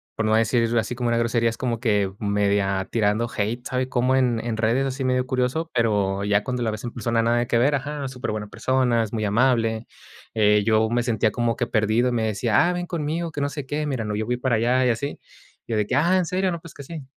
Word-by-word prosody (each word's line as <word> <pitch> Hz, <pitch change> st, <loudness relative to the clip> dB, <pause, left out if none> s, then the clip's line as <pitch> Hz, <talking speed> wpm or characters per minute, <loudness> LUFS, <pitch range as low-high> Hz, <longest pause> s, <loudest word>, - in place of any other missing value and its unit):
por 110 Hz, -, -1 dB
no 110 Hz, -, +2 dB
decir 115 Hz, +1 st, +2 dB
así 110 Hz, +2 st, -3 dB
como 120 Hz, -1 st, -1 dB
una 115 Hz, -, +1 dB
grosería, 115 Hz, 0 st, +1 dB
es 115 Hz, -, -9 dB
como 120 Hz, -3 st, -2 dB
que 105 Hz, -5 st, +1 dB
media 100 Hz, -2 st, 0 dB
tirando 110 Hz, +1 st, +1 dB
hate, 110 Hz, +4 st, -2 dB
¿sabe? 130 Hz, 0 st, -2 dB
Como 125 Hz, +1 st, +2 dB
en 125 Hz, -3 st, +2 dB, 0.2 s
redes, 120 Hz, +5 st, +1 dB
así 135 Hz, +1 st, -4 dB
medio 125 Hz, 0 st, +1 dB
curioso. 130 Hz, +6 st, -1 dB
Pero 100 Hz, -4 st, +1 dB
ya 100 Hz, 0 st, +2 dB
cuando 125 Hz, -1 st, -2 dB
la 110 Hz, -, 0 dB
ves 105 Hz, -1 st, -6 dB
en 120 Hz, -, -4 dB
persona, 115 Hz, -1 st, 0 dB
nada 120 Hz, +1 st, +2 dB
que 120 Hz, 0 st, +1 dB
ver, 140 Hz, +4 st, +3 dB
ajá, 140 Hz, 0 st, -4 dB
superbuena 110 Hz, -5 st, -4 dB
persona, 125 Hz, 0 st, +1 dB
es 110 Hz, -, -7 dB
muy 110 Hz, -2 st, -1 dB
amable. 115 Hz, +1 st, +1 dB, 0.5 s
Eh 105 Hz, -1 st, +3 dB
yo 110 Hz, 0 st, +3 dB
me 120 Hz, +1 st, +1 dB
sentía 110 Hz, -2 st, +1 dB
como 120 Hz, +1 st, 0 dB
que 120 Hz, -, -2 dB
perdido, 110 Hz, +3 st, +1 dB
me 115 Hz, -2 st, 0 dB
decía: 110 Hz, +4 st, +2 dB
"Ah, -, -, 0 dB
ven 175 Hz, 0 st, -4 dB
conmigo, 165 Hz, 0 st, -3 dB
que 150 Hz, -, -5 dB
no 140 Hz, -, 0 dB
sé 145 Hz, -2 st, -6 dB
qué. 150 Hz, +2 st, -2 dB
Mira, 130 Hz, -6 st, -2 dB
no, 105 Hz, -1 st, -3 dB
yo 110 Hz, +1 st, -2 dB
fui 125 Hz, +2 st, -1 dB
para 125 Hz, -1 st, 0 dB
allá 125 Hz, +3 st, +2 dB
y -, -, +3 dB
así". 120 Hz, +5 st, -2 dB, 0.5 s
Yo 115 Hz, -, -1 dB
de 105 Hz, -, +1 dB
que: 105 Hz, -, -4 dB
"Ah, 170 Hz, +6 st, +3 dB
¿en 185 Hz, -, +1 dB
serio? 185 Hz, +2 st, 0 dB
No, 170 Hz, -, -4 dB
pues 165 Hz, -1 st, -13 dB
que -, -, -10 dB
sí". 155 Hz, +1 st, -8 dB
120 Hz, 245 wpm, -23 LUFS, 110-130 Hz, 0.5 s, ver